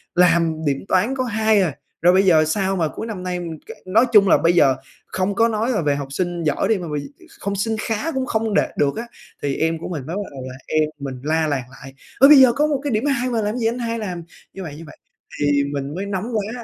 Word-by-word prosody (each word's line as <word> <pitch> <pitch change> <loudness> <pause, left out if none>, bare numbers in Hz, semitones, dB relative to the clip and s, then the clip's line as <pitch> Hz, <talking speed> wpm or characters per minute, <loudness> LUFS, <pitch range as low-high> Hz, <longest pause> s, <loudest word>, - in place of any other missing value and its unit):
làm 165 -3 +3
điểm 140 -1 -1
toán 220 +9 +1
có 255 - -1
2 220 -2 +2
à, 165 -7 -1 0.3
rồi 175 +2 +5
bây 190 +1 +4
giờ 160 -4 +5
sao 195 +4 0
mà 165 -4 +1
cuối 225 - -6
năm 190 -5 -6
nay 180 -1 -3
m - - -5 0.2
kệ - - -8
nói 220 +7 +4
chung 200 -2 +7
là - - +6
bây 170 +1 +2
giờ 140 -6 +4 0.3
không 190 +2 -2
có 230 +2 +4
nói 225 +2 -1
là 210 -7 0
về 145 -2 +1
học 140 -1 -4
sinh 175 +2 -2
giỏi 150 -2 0
đi, 220 -2 +2
mà 175 -2 -6
bây 150 - -1
gi - - -7 0.3
không 200 0 -3
sinh 220 +3 -1
khá 225 +9 -2
cũng 265 -3 -2
không 220 -3 -1
đạt - - 0
được 140 -1 +1
á." 235 +1 -5 0.3
Thì 140 -1 -1
em 165 0 0
của - - -6
mình 150 -7 -5
mới 165 +5 -5
bắt 205 - -2
đầu 135 - -8
là 130 - -8
em 155 -1 +1
mình 135 -2 -5
la 160 +1 +1
làng 135 -4 -2
lại: 135 0 -12 0.3
"Ơ, 275 - +9
bây 300 -1 +9
giờ 255 -2 +7
có 300 +4 +2
một 285 -3 0
cái 285 - -2
điểm 215 +4 0
2 255 -3 0
mà 230 -2 0
làm 210 0 -1
cái 250 - -3
gì 225 - -1
anh 240 +2 -2
hai 230 -1 -2
làm 180 -5 -5 0.3
như 195 - -7
vậy, 155 -4 -7
như 165 - -10
vậy." - - -14 0.4
Thì 145 -1 +2
mình 140 +2 -4
mới 195 - -3
nóng 200 0 -3
quá 225 +4 -4
185 Hz, 280 wpm, -21 LUFS, 155-225 Hz, 0.4 s, Ơ